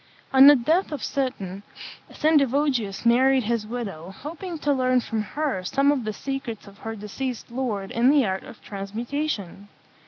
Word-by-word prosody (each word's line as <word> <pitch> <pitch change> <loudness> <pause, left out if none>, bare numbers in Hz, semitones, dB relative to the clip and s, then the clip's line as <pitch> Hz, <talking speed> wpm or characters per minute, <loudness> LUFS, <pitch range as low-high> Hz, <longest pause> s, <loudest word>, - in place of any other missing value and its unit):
On 265 +1 +9
the 290 - +10
death 315 +10 +1
of 290 -4 -4
Seton, 200 -9 -3 0.5
Sendivogius 275 -8 +1
married 260 +2 +4
his 225 -1 -1
widow, 200 -8 -5
hoping 325 - -7
to 295 -1 +1
learn 255 -1 +2
from 225 -2 -2
her 265 -3 -2
some 275 +9 +2
of 265 -6 -1
the 215 - -1
secrets 255 -2 -5
of 200 0 -15
her 225 0 -5
deceased 235 +4 -5
lord 225 -6 -3
in 240 +3 +3
the 285 -3 +4
art 190 -1 -2
of - - -12
transmutation. 205 - -4
245 Hz, 160 wpm, -24 LUFS, 210-280 Hz, 0.5 s, the